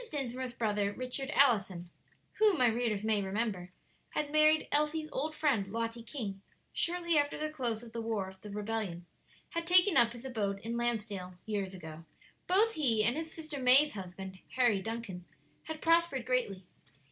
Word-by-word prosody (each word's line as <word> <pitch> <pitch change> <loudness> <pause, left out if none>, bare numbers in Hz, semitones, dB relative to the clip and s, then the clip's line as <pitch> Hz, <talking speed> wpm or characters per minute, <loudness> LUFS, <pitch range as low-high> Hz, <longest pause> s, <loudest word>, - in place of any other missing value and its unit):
Dinsmore's 255 -3 -4
brother, 210 -3 0
Richard 255 +4 -4
Allison, 195 - +2 0.5
who, 425 -4 +4
my 255 - +4
readers 225 -3 0
may 215 -2 +2
remember, 195 -2 -2 0.4
had 300 -1 -1
married 310 0 +4
Elsie's 305 +1 +1
old 310 +4 -2
friend, 250 -12 0
Lottie 230 +1 -3
King, 215 -5 -6 0.3
shortly 340 -2 +1
after 290 0 -1
the 305 0 -3
close 240 -6 -2
of 235 - -11
the 230 0 -4
war 220 -4 -2
of 190 0 -13
the 210 - -9
rebellion, 205 -4 -4 0.5
had 335 0 -3
taken 360 +1 +6
up 235 0 +5
his 240 +2 -11
abode 210 -6 -2
in 230 +2 -4
Lansdale 210 -6 -2
years 200 -3 -3
ago. 160 -2 -10 0.4
Both 410 +5 +4
he 235 -9 +2
and 240 +4 +3
his 320 +1 -5
sister 310 -3 -6
May's 265 +4 +6
husband, 190 -1 -8 0.2
Harry 240 -6 +3
Duncan, 225 -4 -5 0.4
had 315 -1 -6
prospered 330 -6 +3
greatly. 235 -7 -1
235 Hz, 165 wpm, -32 LUFS, 200-295 Hz, 0.5 s, taken